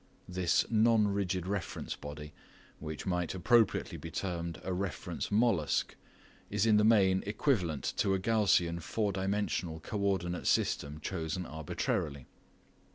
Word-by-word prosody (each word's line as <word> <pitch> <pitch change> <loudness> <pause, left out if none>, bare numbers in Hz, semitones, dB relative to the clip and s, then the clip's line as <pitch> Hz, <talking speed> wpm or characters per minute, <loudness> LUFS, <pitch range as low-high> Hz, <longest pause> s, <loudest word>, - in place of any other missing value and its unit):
This 90 -1 +1
non 110 -1 +4
rigid 95 -3 -1
reference 100 0 -3
body, 75 +1 -8 0.5
which 80 -1 -6
might 90 -2 -1
appropriately 115 +4 +2
be 80 - -7
termed 85 -1 -3
a 95 - -2
"reference 95 +1 -3
mollusc", 105 -8 +2 0.6
is 105 +1 +1
in 110 -2 +5
the 105 - +4
main 95 -4 +4
equivalent 100 - 0
to 95 -1 +2
a - - -1
Gaussian 95 -5 +2
four 105 +5 -1
dimensional 95 -4 -1
co 105 +6 -5
ordinate 95 -3 -1
system 75 +2 0
chosen 90 +1 -3
arbitrarily. 75 -3 -3
95 Hz, 130 wpm, -32 LUFS, 85-105 Hz, 0.6 s, in